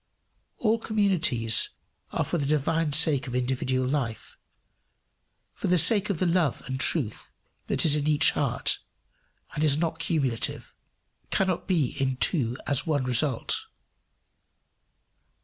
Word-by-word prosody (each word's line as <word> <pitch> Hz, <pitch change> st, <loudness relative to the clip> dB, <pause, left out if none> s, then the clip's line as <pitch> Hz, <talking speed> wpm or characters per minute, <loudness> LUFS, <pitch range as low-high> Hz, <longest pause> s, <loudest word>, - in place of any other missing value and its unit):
All 225 Hz, 0 st, +1 dB
communities 175 Hz, -, +1 dB, 0.4 s
are -, -, -1 dB
for 170 Hz, -, -2 dB
the 140 Hz, -, -2 dB
divine 155 Hz, +2 st, 0 dB
sake 145 Hz, -2 st, +4 dB
of 125 Hz, -, -5 dB
individual 130 Hz, 0 st, -1 dB
life, 125 Hz, -6 st, -3 dB, 1.2 s
for -, -, -4 dB
the 180 Hz, -, +3 dB
sake 210 Hz, +5 st, +4 dB
of 195 Hz, -, -1 dB
the 185 Hz, -, 0 dB
love 170 Hz, -5 st, 0 dB
and 130 Hz, 0 st, -4 dB
truth 135 Hz, -6 st, -1 dB, 0.4 s
that -, -, 0 dB
is 150 Hz, -2 st, +7 dB
in 150 Hz, 0 st, -1 dB
each 150 Hz, -1 st, +4 dB
heart, -, -, 0 dB, 0.7 s
and 150 Hz, -, -2 dB
is 145 Hz, -2 st, +4 dB
not 165 Hz, 0 st, -2 dB
cumulative 140 Hz, -8 st, -2 dB, 0.6 s
cannot 185 Hz, -2 st, -1 dB
be 165 Hz, -10 st, +1 dB
in 130 Hz, -1 st, 0 dB
two 125 Hz, -6 st, +1 dB
as 140 Hz, +3 st, 0 dB
one 145 Hz, -4 st, 0 dB
result. 125 Hz, 0 st, -1 dB
150 Hz, 130 wpm, -26 LUFS, 130-170 Hz, 1.2 s, is